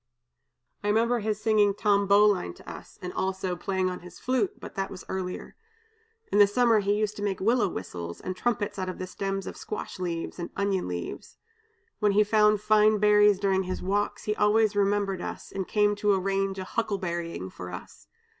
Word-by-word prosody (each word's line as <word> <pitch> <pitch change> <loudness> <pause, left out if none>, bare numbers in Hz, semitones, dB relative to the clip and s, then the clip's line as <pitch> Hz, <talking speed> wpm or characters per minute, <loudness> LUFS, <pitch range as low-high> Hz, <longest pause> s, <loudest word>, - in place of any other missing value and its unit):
"I - - -2
remember 230 +3 +2
his 215 -1 -2
singing 215 -2 +3
'Tom 200 -1 +2
Bowline' 200 - +4
to - - -17
us, - - -10
and 180 - -5
also 190 -1 -2
playing 190 +1 -1
on 180 0 -3
his 180 0 -13
flute, 250 -6 -1
but - - -9
that 195 0 -3
was 185 - -9
earlier. 185 -1 -5 0.8
In 205 - +3
the 205 - +8
summer 230 +1 +3
he 205 0 +1
used 210 0 -1
to - - -6
make 200 -2 -1
willow 225 +2 +2
whistles, 85 - -6
and 185 - -5
trumpets 210 -2 -1
out 185 0 -2
of 185 - -6
the 185 - -4
stems 195 +1 -3
of - - -6
squash 210 -2 -6
leaves, 170 -1 -4
and 170 - -4
onion 200 -2 0
leaves. 90 -1 -6 0.6
When 210 -2 +3
he 210 +1 +5
found 210 0 +3
fine 215 0 +4
berries 210 -1 +5
during 195 -1 +2
his 185 - -4
walks, 200 +2 -1
he 210 - -1
always 210 0 +3
remembered 200 -2 +1
us, - - -6
and 190 -1 -4
came 210 -1 +2
to 205 -1 +3
arrange 195 0 -1
a 190 - -4
huckleberrying 175 - -3
for 90 - -8
us. 90 - -10
200 Hz, 190 wpm, -27 LUFS, 185-210 Hz, 0.8 s, the